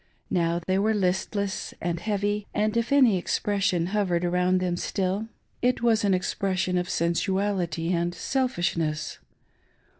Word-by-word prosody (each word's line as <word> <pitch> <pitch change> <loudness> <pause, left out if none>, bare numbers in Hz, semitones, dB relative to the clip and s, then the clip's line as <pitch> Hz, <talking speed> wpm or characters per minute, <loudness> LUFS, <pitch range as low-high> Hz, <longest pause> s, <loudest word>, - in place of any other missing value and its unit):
Now 170 -2 +1
they 190 +1 +1
were 215 +2 +2
listless 195 +1 -1
and 170 -1 -2
heavy; 205 +1 -1
and 215 +1 +1
if 235 +2 0
any 255 -8 +5
expression 195 -2 0
hovered 180 -4 +1
around 180 +1 +2
them 180 -1 0
stilly 190 +4 -1 0.3
it 250 -1 +1
was 225 -2 +3
an 195 -2 +3
expression 185 0 0
of 180 - -3
sensuality 175 -1 0
and 175 0 0
selfishness. 170 - -1
190 Hz, 130 wpm, -26 LUFS, 175-205 Hz, 0.3 s, any